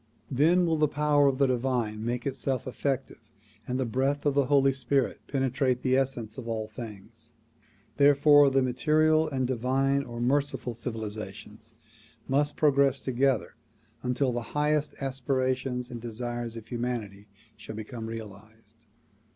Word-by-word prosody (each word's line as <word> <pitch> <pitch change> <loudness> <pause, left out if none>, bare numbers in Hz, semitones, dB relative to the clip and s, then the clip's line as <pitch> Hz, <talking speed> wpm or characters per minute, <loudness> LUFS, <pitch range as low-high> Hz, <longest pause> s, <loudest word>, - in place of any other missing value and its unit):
Then 165 +7 +4
will 165 -1 +1
the 150 0 +3
power 145 0 +3
of 135 -1 +1
the 140 - +4
divine 120 -4 -1
make 120 +1 -2
itself 135 -2 -2
effective 135 0 -3 0.5
and 125 +1 -2
the 130 - +1
breath 135 +5 -1
of 145 - +3
the 140 -2 +2
Holy 135 -1 +4
Spirit 135 -1 0
penetrate 130 -2 0
the 130 -1 +3
essence 130 -4 -1
of 120 - -8
all 110 -2 -2
things. 110 +1 -9 0.6
Therefore 145 0 +6
the 135 0 +2
material 155 +5 +2
and 135 -3 -1
the 130 - 0
divine 135 +3 +1
or 120 -3 -8
merciful 135 0 0
civilizations 110 -1 -7 0.5
must 145 +2 +1
progress 140 -2 +3
together 130 +1 0 0.5
until 125 +1 0
the 120 +2 -5
highest 150 0 +1
as 135 -1 -3
pirations 130 -1 -1
and 120 -2 -6
desires 120 0 -4
of 115 -2 -8
humanity 115 -5 -4 0.3
shall 110 - -9
become 110 +1 -6
realized. 110 0 -11
130 Hz, 145 wpm, -28 LUFS, 115-140 Hz, 0.6 s, Therefore